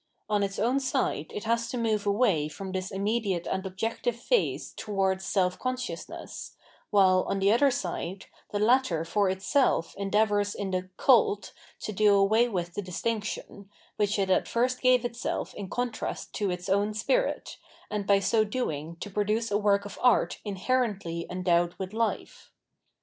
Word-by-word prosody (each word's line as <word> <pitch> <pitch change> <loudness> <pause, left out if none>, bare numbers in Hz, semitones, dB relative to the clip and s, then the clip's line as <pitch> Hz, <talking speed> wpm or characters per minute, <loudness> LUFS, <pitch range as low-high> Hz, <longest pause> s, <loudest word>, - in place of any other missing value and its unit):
On 210 -1 +1
its 195 -1 -2
own 245 +6 +2
side 260 - -1
it 205 - -5
has 230 +1 0
to 250 - -3
move 220 -3 0
away 200 -8 +2
from 190 +5 -7
this 185 0 -3
imm 195 +1 -2
ediate 205 -6 0
and 190 - -2
objective 225 +5 -2
phase 460 - 0
towards 190 -2 -1
self 185 -2 0
consciousness, 250 -9 -5 0.3
while, 185 -2 +5
on - - 0
the 195 +1 +3
other 270 +5 +5
side, 190 -4 -4 0.2
the 205 - -2
latter 210 -7 +2
for 200 +3 +1
itself 190 0 +1
endeavours 205 0 +1
in 200 -2 -3
the 185 0 -2
" - - -51
cult 220 -5 +3
" - - -26
to - - -3
do 210 0 +4
away 215 +4 +4
with 175 -4 -3
the 205 - -3
distinction, 200 +1 -4 0.3
which 210 0 +1
it 195 -1 +1
at - - +2
first 250 +2 0
gave 255 -1 +4
itself 240 0 -3
in 200 -3 -7
contrast 245 +1 -3
to 205 -2 -1
its 180 0 -4
own 200 +2 +1
spirit, - - 0 0.3
and 205 -2 -2
by 200 - +6
so 215 +3 +2
doing 170 - -3
to 205 +4 -8
produce 210 +3 0
a 205 - +3
work 200 -1 +2
of 205 - -8
art 250 -1 +3
inherently 200 -5 -1
endowed 175 -1 +1
with 190 -1 -5
hfe. 225 +1 -2
205 Hz, 170 wpm, -28 LUFS, 190-230 Hz, 0.3 s, by